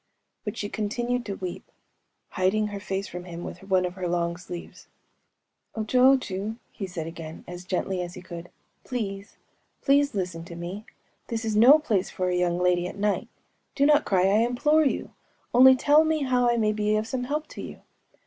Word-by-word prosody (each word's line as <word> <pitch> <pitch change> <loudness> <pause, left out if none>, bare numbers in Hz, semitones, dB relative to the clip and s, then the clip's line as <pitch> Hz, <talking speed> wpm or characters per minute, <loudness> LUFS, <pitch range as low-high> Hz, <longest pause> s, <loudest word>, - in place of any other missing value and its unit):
But 210 - -5
she 205 - -2
continued 240 +3 -2
to 200 - -3
weep,‚ÄĒhiding 190 +2 -4
her 200 -1 -5
face 195 0 -3
from 180 0 -7
him 175 -1 -7
with 180 - -7
one 190 -1 +1
of 180 - -3
her 185 -1 -4
long 170 0 0
sleeves. 175 0 -9 0.9
“O 220 - -2
jochŇę,‚ÄĚ 225 -4 +2
he 195 - -5
said 175 -3 -5
again, 165 -1 -8
as 180 0 -8
gently 185 0 -1
as 175 0 -6
he 185 - -8
could,‚ÄĒ‚Äúplease, 195 +4 -7 0.5
please 280 -2 +3
listen 180 -4 -3
to 170 -1 -9
me!... 180 +5 -6 0.4
This 225 -1 -3
is 220 -1 -1
no 245 +8 +8
place 215 -11 0
for 185 -1 -2
a 180 - 0
young 175 -1 +1
lady 180 0 +2
at 180 - -8
night! 205 +1 0 0.5
Do 280 - +3
not 295 0 +5
cry, 185 -2 +2
I 195 +3 +4
implore 260 +7 +3
you!‚ÄĒonly 260 -1 +3
tell 295 +4 +5
me 315 -2 +1
how 250 -2 +2
I 235 - +2
may 215 -2 +2
be 210 0 +1
of 215 0 0
some 250 +2 -3
help 300 +4 -2
to - - -8
you! - - -9
205 Hz, 185 wpm, -26 LUFS, 180-245 Hz, 0.9 s, no